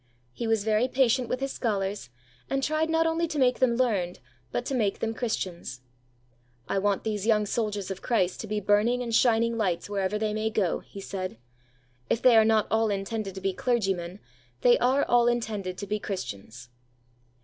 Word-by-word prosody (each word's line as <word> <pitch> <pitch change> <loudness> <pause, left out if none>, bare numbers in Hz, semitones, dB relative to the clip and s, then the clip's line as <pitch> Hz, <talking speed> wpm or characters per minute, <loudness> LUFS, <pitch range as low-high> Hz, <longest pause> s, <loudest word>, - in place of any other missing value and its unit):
He 235 - -4
was 225 -2 +1
very 215 +3 +2
patient 255 -1 +2
with 255 - -2
his 275 0 -1
scholars, 195 - -2 0.4
and 270 0 -1
tried 310 +3 +1
not 325 0 +2
only 325 +1 +1
to 310 -2 -4
make 255 -2 +3
them 245 -2 +3
learned, 205 -8 0 0.3
but 245 - -2
to 275 - -3
make 215 -6 +1
them 225 0 -2
Christians. 180 - -4 0.9
"I 195 - 0
want 200 0 0
these 215 -1 -2
young 210 -2 +3
soldiers 205 -3 -2
of 190 - -6
Christ 190 -7 0
to 220 - -7
be 210 0 -1
burning 210 +5 +2
and 230 -1 -4
shining 230 0 +3
lights 185 -2 -1
wherever 195 0 0
they 215 0 -1
may 215 +1 -1
go," 205 -6 0
he 200 - -11
said. 185 - -5 0.7
"If - - +2
they 245 -1 +6
are 220 - +7
not 220 -1 +3
all 220 0 +2
intended 200 0 -3
to 190 - -7
be 195 0 0
clergymen, 195 -6 -1 0.4
they - - +6
are 265 +3 +3
all 240 0 +4
intended 215 -6 -1
to 200 - -5
be 210 +1 -2
Christians." 120 - -6
215 Hz, 190 wpm, -27 LUFS, 195-240 Hz, 0.9 s, are